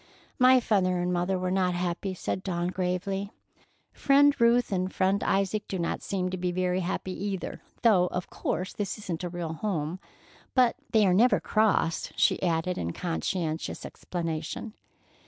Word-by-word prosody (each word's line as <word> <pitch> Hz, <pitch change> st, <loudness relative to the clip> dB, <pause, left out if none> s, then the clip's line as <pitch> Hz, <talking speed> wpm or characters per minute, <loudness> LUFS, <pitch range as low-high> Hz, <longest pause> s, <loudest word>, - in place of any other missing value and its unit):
"My 255 Hz, 0 st, +7 dB
father 190 Hz, -6 st, +1 dB
and 180 Hz, 0 st, 0 dB
mother 180 Hz, +2 st, 0 dB
were 180 Hz, 0 st, -2 dB
not 185 Hz, -1 st, +1 dB
happy," 180 Hz, +2 st, -2 dB
said 185 Hz, -, -3 dB
Dawn 175 Hz, -2 st, -2 dB
gravely. 185 Hz, +2 st, -2 dB, 0.6 s
"Friend 285 Hz, +1 st, +4 dB
Ruth 235 Hz, 0 st, +4 dB
and 185 Hz, -1 st, -1 dB
Friend 190 Hz, +1 st, +1 dB
Isaac 195 Hz, +2 st, 0 dB
do 190 Hz, -, -3 dB
not 170 Hz, -1 st, -2 dB
seem 185 Hz, -2 st, -2 dB
to 185 Hz, -, -3 dB
be 180 Hz, 0 st, -1 dB
very 180 Hz, 0 st, 0 dB
happy 185 Hz, +1 st, -3 dB
either, 195 Hz, -2 st, -4 dB, 0.2 s
though 195 Hz, -6 st, +5 dB
of 180 Hz, 0 st, -4 dB
course 185 Hz, +1 st, -3 dB
this 205 Hz, -2 st, -3 dB
isn't 185 Hz, -5 st, -5 dB
a 175 Hz, -, -2 dB
real 170 Hz, -2 st, -4 dB
home. 165 Hz, -2 st, -2 dB, 0.6 s
But 250 Hz, -2 st, +4 dB, 0.2 s
they 215 Hz, -2 st, +5 dB
are 185 Hz, -, +4 dB
never 240 Hz, +7 st, +5 dB
cross," 215 Hz, -6 st, +1 dB
she -, -, +2 dB
added 175 Hz, 0 st, 0 dB
in 85 Hz, 0 st, -3 dB
conscientious 165 Hz, -2 st, -3 dB
explanation. 165 Hz, +5 st, -4 dB
185 Hz, 160 wpm, -28 LUFS, 175-200 Hz, 0.6 s, My